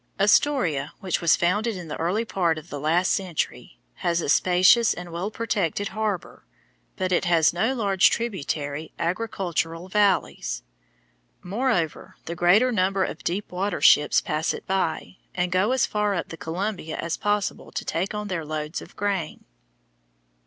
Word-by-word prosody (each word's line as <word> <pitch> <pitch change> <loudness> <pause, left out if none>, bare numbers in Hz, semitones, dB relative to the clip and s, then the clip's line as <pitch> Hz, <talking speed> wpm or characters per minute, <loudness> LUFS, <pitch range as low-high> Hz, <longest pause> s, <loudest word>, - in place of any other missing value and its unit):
Astoria, 195 - +2
which 185 -2 -1
was 170 -2 +5
founded 205 +5 0
in 175 -2 -8
the 150 - -5
early 185 +8 0
part 175 -7 0
of 155 +2 -10
the 145 - -4
last 165 +5 +2
century, 185 -5 -3 0.2
has 170 -1 0
a 160 - -2
spacious 185 +8 +5
and 175 -1 -8
well 175 +5 -3
protected 205 -4 -1
harbor, 215 -3 -3 0.5
but 185 -1 -2
it 180 - +2
has 165 -3 +4
no 220 +9 0
large 200 -5 +4
tributary 155 -9 -3
agricultural 175 -2 -2
valleys. 190 - +1 0.8
Moreover, 190 -4 -1
the 170 - -4
greater 195 +9 +4
number 190 -2 +1
of 160 - -5
deep 190 +4 -3
water 185 0 -2
ships 150 0 +5
pass 155 +2 -1
it - - -10
by, 185 -1 -2 0.2
and 180 0 0
go 185 +5 +2
as 260 -1 +3
far 210 -1 0
up 175 - -3
the - - -6
Columbia 170 0 -4
as 170 0 -2
possible 205 -1 -2
to - - -4
take 185 +5 -2
on 210 0 -4
their 175 -4 -3
loads 155 +1 -4
of - - -13
grain. 195 -6 -2
185 Hz, 160 wpm, -25 LUFS, 165-205 Hz, 0.8 s, was